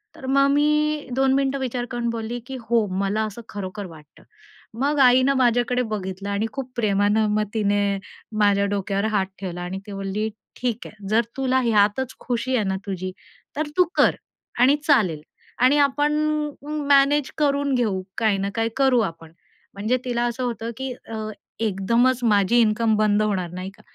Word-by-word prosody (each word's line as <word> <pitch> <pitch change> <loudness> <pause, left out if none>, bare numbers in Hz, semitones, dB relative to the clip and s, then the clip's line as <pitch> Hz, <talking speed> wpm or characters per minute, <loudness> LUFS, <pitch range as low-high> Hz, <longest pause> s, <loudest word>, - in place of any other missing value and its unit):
तर - - -10
मग 275 +1 +3
मी 300 +1 +1
2 265 0 +3
मिनिटं 275 0 +1
विचार 250 -2 -2
करून 240 -1 -2
बोलली 230 +1 -4
की 265 - -6
"हो, 230 -2 +3
मला 200 +2 0
असं 215 +2 -7
खरोखर 200 0 -6
वाटतं." 155 -3 -16 0.6
मग 290 +2 +1
आईनं 260 +1 +5
माझ्याकडे 245 0 +2
बघितलं 195 -1 -4
आणि 200 +2 0
खूप 260 -2 -5
प्रेमानं 210 -1 +2
मग 215 - +2
तिने 205 -2 +1 0.4
माझ्या 200 -1 +3
डोक्यावर 200 0 -1
हात 200 -3 +1
ठेवला 180 -2 -5
आणि 180 +2 -4
ती - - -7
म्हणली, 195 +2 -2 0.3
"ठीक 240 -2 -2
आहे, 205 -2 -12
जर 220 +2 +4 0.2
तुला 260 -1 +2
ह्यातच 225 +2 +2
खुशी 255 +1 -1
आहे 220 -4 +1
ना 190 - 0
तुझी 185 -2 -4 0.5
तर 305 0 -1
तू 365 - +7
कर - - +4 0.4
आणि 260 +4 +6
चालेल 185 - +3 0.4
आणि 260 +4 +5
आपण 290 +1 +2 0.5
म 300 +1 -4
मॅनेज 280 0 +4
करून 285 -1 +1
घेऊ. 215 -6 0 0.2
काही 215 -3 +2
ना 195 +1 -2
काही 225 0 0
करू 265 -2 +4
आपण." 165 -5 -5 0.4
म्हणजे 215 +6 0
तिला 240 -1 0
असं 240 +1 -2
होतं, 230 -1 -3
की 265 -1 -4
अ, 220 -1 -5 0.3
एकदमच 230 +5 +2
माझी 210 0 +3
इन्कम 220 0 +2
बंद 210 -1 +3
होणार, 195 -5 -1
नाही 185 +1 -5
का? 215 - -20
225 Hz, 170 wpm, -23 LUFS, 200-260 Hz, 0.6 s, तू